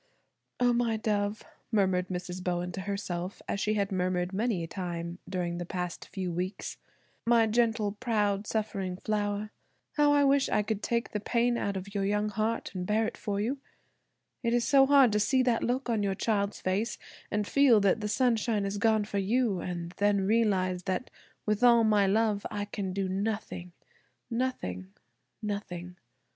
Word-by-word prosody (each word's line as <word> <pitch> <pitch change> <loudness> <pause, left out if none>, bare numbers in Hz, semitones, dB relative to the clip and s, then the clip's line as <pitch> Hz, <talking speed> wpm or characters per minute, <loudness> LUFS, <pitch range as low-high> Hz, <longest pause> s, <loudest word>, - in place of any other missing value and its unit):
"Oh! 245 -1 +4
my 235 -2 +1
dove," 210 -1 -1 0.3
murmured 190 -4 +2
Mrs. 180 0 -5
Bowen 180 0 -1
to 190 - -5
herself, 190 -2 -4
as 200 - -2
she 215 +2 +1
had 200 -1 0
murmured 180 0 0
many 210 -3 0
a - - -4
time 170 -1 -5
during 175 -2 -2
the - - -2
past 180 -1 -4
few 185 -2 -3
weeks; 180 +3 -4 0.5
"my 235 -1 +5
gentle, 220 -2 +1
proud, 210 -2 0
suffering 195 -4 -2
flower, 210 0 -2 0.5
how 295 -1 +5
I 290 0 +5
wish 275 0 +3
I 210 - +2
could 215 -1 -2
take 235 +1 -1
the 210 - -2
pain 240 +3 +1
out 200 -4 -1
of 195 +2 -7
your 200 -1 0
young 210 +1 +1
heart 215 +2 -2
and 185 -2 -3
bear 220 +1 +2
it - - -3
for 200 -1 -3
you; 250 +7 -1 0.8
it 235 -1 +1
is 240 - +1
so 275 -2 +6
hard 275 -4 +6
to 210 - +2
see 255 +5 +3
that 245 -3 +1
look 255 +2 -1
on 225 -3 +1
your 195 -1 0
child 200 -1 0
face, 195 +5 -1 0.3
and 210 0 0
feel 265 -2 +5
that 200 +2 +2
the 210 - -1
sunshine 230 -3 +1
is 200 +1 -2
gone 220 -1 +3
for 200 -1 -2
you, 215 0 +1
and 175 -1 -4
then 200 -1 +2
realize 190 -4 +2
that 190 +6 -2 0.3
with 215 +2 0
all 235 -1 +7
my 210 -2 +4
love 210 0 +2
I 205 -1 -3
can 200 -2 -4
do 195 0 -1
nothing–nothing, 200 - -4 0.5
nothing. 180 -4 -5
205 Hz, 175 wpm, -29 LUFS, 185-230 Hz, 0.8 s, all